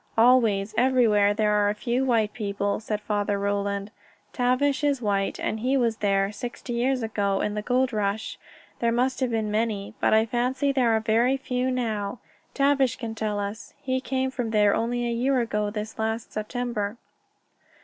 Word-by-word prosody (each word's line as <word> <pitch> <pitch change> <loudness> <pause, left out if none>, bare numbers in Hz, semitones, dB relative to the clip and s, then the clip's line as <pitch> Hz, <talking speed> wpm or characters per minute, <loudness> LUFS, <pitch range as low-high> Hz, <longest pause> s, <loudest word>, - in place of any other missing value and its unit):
"Always, 225 -4 +4
everywhere, 235 -6 +4
there 210 0 +2
are 205 -1 +3
a 205 - -1
few 240 +4 -1
white 225 -5 +1
people," 200 -2 -2
said 215 -1 -3
Father 205 -1 -1
Roland. 200 0 -2 0.4
"Tavish 260 +3 +1
is 285 -2 +2
white, 200 -4 -1
and 220 - -2
he 260 +4 +1
was 230 -3 +1
there. 195 -1 +1
Sixty 240 +3 -6
years 250 +1 0
ago, 200 -3 0
in 210 - -1
the 210 - -2
gold 255 +3 +1
rush, 210 0 -2 0.4
there 235 0 +1
must 255 +3 0
have 260 -2 0
been 220 -2 -1
many. 215 -2 -1
But - - +3
I 220 +1 +4
fancy 250 +4 0
there 260 -3 +2
are - - +2
very 235 +4 +2
few 255 -1 -2
now. 225 -4 -2 0.4
Tavish 275 -3 +3
can 230 -3 -5
tell 215 -2 -2
us. 205 +2 -6
He 260 0 -2
came 260 0 -1
from 245 -3 -3
there 210 -2 +3
only 240 +2 -1
a - - -1
year 255 +3 +1
ago 210 -3 -1
this 210 +1 -6
last 220 +1 -2
September." 215 -1 -3
225 Hz, 180 wpm, -25 LUFS, 210-250 Hz, 0.4 s, Always